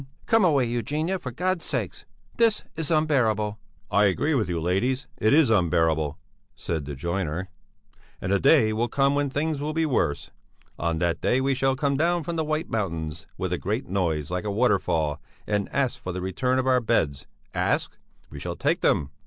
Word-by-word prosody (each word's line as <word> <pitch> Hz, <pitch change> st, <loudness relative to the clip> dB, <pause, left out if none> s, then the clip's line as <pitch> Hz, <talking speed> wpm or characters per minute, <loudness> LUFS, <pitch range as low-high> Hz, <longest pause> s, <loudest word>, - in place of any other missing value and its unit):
"Come 225 Hz, -2 st, +4 dB
away, 145 Hz, -8 st, +4 dB
Eugenia, 150 Hz, -, -1 dB
for 130 Hz, -, -5 dB
God's 180 Hz, +7 st, -1 dB
sake! -, -, -3 dB, 0.3 s
This 230 Hz, -2 st, +3 dB
is 160 Hz, -2 st, -3 dB
unbearable!" 115 Hz, -10 st, +1 dB, 0.3 s
"I 105 Hz, +1 st, +4 dB
agree 140 Hz, -, +1 dB
with 110 Hz, -10 st, +1 dB
you, 85 Hz, -1 st, -1 dB
ladies, 105 Hz, +11 st, 0 dB
it 110 Hz, -, +3 dB
is 145 Hz, -5 st, +5 dB
unbearable," 80 Hz, -6 st, +2 dB, 0.4 s
said 80 Hz, -4 st, -3 dB
the 70 Hz, 0 st, -5 dB
joiner. 85 Hz, +3 st, -3 dB, 0.7 s
"And 95 Hz, -, -3 dB
the 100 Hz, -, +3 dB
day 135 Hz, -7 st, +5 dB
will 115 Hz, +2 st, 0 dB
come 140 Hz, +2 st, +2 dB
when 145 Hz, 0 st, +1 dB
things 145 Hz, +1 st, -1 dB
will 150 Hz, +1 st, -2 dB
be 160 Hz, 0 st, +1 dB
worse; 120 Hz, -, 0 dB, 0.5 s
on 85 Hz, 0 st, 0 dB
that 85 Hz, 0 st, 0 dB
day 125 Hz, -, +2 dB
we 135 Hz, +1 st, +1 dB
shall 135 Hz, +1 st, +1 dB
come 140 Hz, 0 st, 0 dB
down 170 Hz, +2 st, +1 dB
from 170 Hz, +3 st, -4 dB
the 160 Hz, -, 0 dB
White 155 Hz, +2 st, -1 dB
Mountains 85 Hz, -7 st, -3 dB
with -, -, -2 dB
a -, -, -1 dB
great -, -, -2 dB
noise, 85 Hz, -5 st, -1 dB
like 90 Hz, +1 st, -2 dB
a 105 Hz, -, -2 dB
waterfall, 90 Hz, -, +1 dB, 0.2 s
and 105 Hz, -1 st, -1 dB
ask 135 Hz, -2 st, -1 dB
for 90 Hz, -, -4 dB
the 90 Hz, -, -4 dB
return 125 Hz, +8 st, 0 dB
of 130 Hz, -, +1 dB
our 130 Hz, -1 st, +3 dB
beds. 80 Hz, -, 0 dB, 0.3 s
Ask? -, -, 0 dB, 0.4 s
We 70 Hz, -, -8 dB
shall -, -, -4 dB
take -, -, 0 dB
them! 70 Hz, -1 st, +2 dB
115 Hz, 190 wpm, -25 LUFS, 90-145 Hz, 0.7 s, is